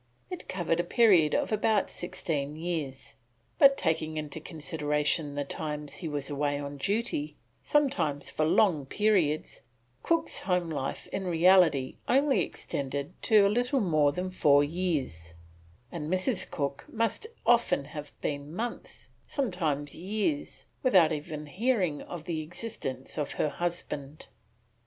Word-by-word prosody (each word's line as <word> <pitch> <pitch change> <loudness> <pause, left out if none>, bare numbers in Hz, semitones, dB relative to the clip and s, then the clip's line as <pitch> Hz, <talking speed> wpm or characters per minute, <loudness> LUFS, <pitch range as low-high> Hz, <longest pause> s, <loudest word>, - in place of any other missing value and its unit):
It 360 - -7
covered 175 -2 0
a - - +2
period 180 -6 +4
of - - 0
about 215 -1 +2
sixteen 165 -5 -3
years; 155 -6 -4 0.5
but 275 -1 +7
taking 155 -1 -1
into 150 0 -5
consideration 150 -2 -1
the 145 - -1
times 150 0 -5
he 175 - -5
was 145 -3 -3
away 145 0 -1
on 145 0 -6
duty, 155 - -1 0.3
sometimes 270 - +1
for 155 - 0
long 155 -3 +3
periods, 185 -6 +1 0.4
Cook's 335 0 +1
home 180 -3 0
life 135 -3 -3
in 195 - -3
reality 170 -6 +4
only 275 +1 +3
extended 140 +1 -3
to 215 -3 +5
a - - +6
little 245 +3 +1
more 155 - +3
than 180 +5 -3
four 145 -6 +5
years, 145 - -2 0.6
and 155 -3 -5
Mrs. 185 +2 0
Cook 140 -2 -3
must 230 - -1 0.2
often 235 -12 +3
have 150 0 -8
been 145 +2 -4
months, 235 +5 -5 0.2
sometimes 160 - -1
years, 215 - -2 0.2
without 185 - +5
even 150 0 -4
hearing 185 - 0
of 175 -3 -7
the 165 -2 -3
existence 155 - -5
of 145 - -2
her 150 - 0
husband. 155 -4 -4
160 Hz, 135 wpm, -29 LUFS, 145-195 Hz, 0.6 s, but